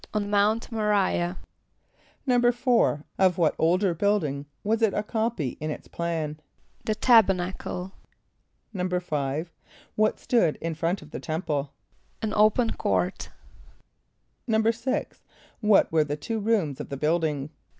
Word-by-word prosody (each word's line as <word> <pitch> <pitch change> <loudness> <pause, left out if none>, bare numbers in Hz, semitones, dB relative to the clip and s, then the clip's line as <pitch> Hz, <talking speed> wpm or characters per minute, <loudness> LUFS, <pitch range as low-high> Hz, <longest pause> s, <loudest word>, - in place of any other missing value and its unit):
=On 205 -1 -1
Mount 210 +3 +2
M[+o] 225 - -2
r[=i]´ah.= 190 -4 +1 0.9
=4.= 245 - +3 0.2
Of 185 -2 +4
what 165 -3 +3
older 180 +3 +3
building 160 -7 0 0.2
was 225 +2 0
it 220 -3 +3
a 205 - 0
copy 220 - -2
in 155 - -2
its 150 - -6
plan? 160 -3 -3 0.5
=The 215 - 0
Tabernacle.= 190 -5 +2 0.8
=5.= 175 -5 -2 0.4
What 215 0 +1
stood 200 -11 +2
in 165 0 -3
front 165 +3 -2
of 150 - -16
the - - -5
temple? 155 -4 -3 0.5
=An 215 -1 -1
open 215 +2 +3
court.= - - -1 1.2
=6.= 230 +5 0 0.4
What 210 -3 +4
were 160 -1 +4
the 145 0 -4
two 220 +9 -3
rooms 200 - 0
of 145 - -6
the 140 - -4
building? 150 -1 0
185 Hz, 130 wpm, -26 LUFS, 155-220 Hz, 1.2 s, Of